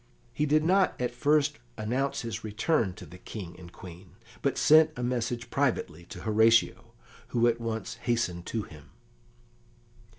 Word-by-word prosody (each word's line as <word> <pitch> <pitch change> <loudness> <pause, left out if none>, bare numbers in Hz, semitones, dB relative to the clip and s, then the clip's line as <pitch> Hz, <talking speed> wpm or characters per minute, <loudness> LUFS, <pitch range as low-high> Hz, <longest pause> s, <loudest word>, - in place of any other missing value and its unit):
He 150 +4 0
did 155 +1 +3
not 185 +3 +2
at 125 -1 -1
first 145 +4 +2 0.2
announce 125 +6 -1
his 115 -1 -5
return 110 - 0
to - - -10
the 90 - -13
King 90 -3 -8
and 85 -1 -12
Queen, 90 +1 -12 0.3
but 140 - 0
sent 155 +1 +6
a 125 - -3
message 120 -1 -2
privately 100 - -1
to - - -10
Horatio, 115 +1 +3 0.3
who 120 -1 +1
at 120 0 0
once 115 0 -4
hastened 115 -8 -1
to 110 -2 -2
him. 75 -5 -14
115 Hz, 155 wpm, -28 LUFS, 105-130 Hz, 0.3 s, sent